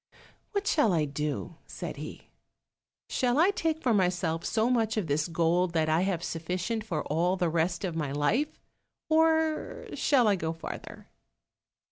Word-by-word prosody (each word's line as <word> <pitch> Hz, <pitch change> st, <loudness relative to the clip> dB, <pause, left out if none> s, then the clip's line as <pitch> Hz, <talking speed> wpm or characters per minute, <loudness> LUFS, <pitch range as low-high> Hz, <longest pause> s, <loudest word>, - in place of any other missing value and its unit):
"What 405 Hz, 0 st, -1 dB
shall 295 Hz, -, +3 dB
I 160 Hz, -3 st, +2 dB
do?" 150 Hz, +2 st, -4 dB
said -, -, -6 dB
he; -, -, -9 dB, 0.8 s
"shall 250 Hz, -1 st, +1 dB
I 345 Hz, +6 st, +5 dB
take 325 Hz, -4 st, -1 dB
for 245 Hz, -, +3 dB
myself 180 Hz, -4 st, +1 dB
so 225 Hz, 0 st, +1 dB
much 225 Hz, -3 st, +1 dB
of 210 Hz, -, 0 dB
this 150 Hz, +1 st, 0 dB
gold, 170 Hz, +1 st, +1 dB
that 160 Hz, -2 st, +1 dB
I 160 Hz, +2 st, +3 dB
have 185 Hz, -3 st, -1 dB
sufficient 180 Hz, +8 st, -2 dB
for 170 Hz, -8 st, -2 dB
all 170 Hz, +5 st, +1 dB
the 175 Hz, -2 st, +1 dB
rest 170 Hz, +3 st, 0 dB
of 175 Hz, -3 st, -3 dB
my 150 Hz, -4 st, -2 dB
life, 150 Hz, -, 0 dB, 0.5 s
or 320 Hz, 0 st, +2 dB
shall 255 Hz, -6 st, +3 dB
I 205 Hz, -, +4 dB
go 160 Hz, -1 st, -2 dB
farther?" 165 Hz, -, -8 dB
180 Hz, 160 wpm, -29 LUFS, 160-245 Hz, 0.8 s, I